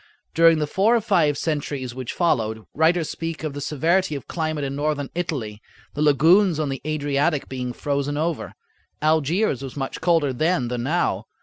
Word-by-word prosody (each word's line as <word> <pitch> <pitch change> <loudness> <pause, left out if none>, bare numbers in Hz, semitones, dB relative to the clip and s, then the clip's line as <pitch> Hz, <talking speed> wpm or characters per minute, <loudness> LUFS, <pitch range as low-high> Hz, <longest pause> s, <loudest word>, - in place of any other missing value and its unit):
During 165 0 +5
the 150 - 0
four 200 +10 +2
or 235 - +2
five 170 -9 +2
centuries 145 -5 -3
which 130 -1 -5
followed, 110 -10 0
writers 160 +1 +2
speak 165 -1 -5
of 155 -3 -3
the 145 - -6
severity 160 +4 +1
of 140 - -7
climate 155 -3 -2
in 135 0 -3
Northern 145 -1 -2
Italy, 130 -12 -4 0.3
the 145 - -4
lagoons 160 +5 +4
on 150 -2 -1
the 135 -1 -4
Adriatic 145 0 0
being 125 -1 -4
frozen 140 +2 -2
over. 160 0 -2 0.5
Algiers 155 - +2
was 135 0 -7
much 135 -1 -4
colder 165 -5 +2
then 155 -2 0
than 120 -1 -2
now. 125 - 0
150 Hz, 175 wpm, -23 LUFS, 135-165 Hz, 0.5 s, During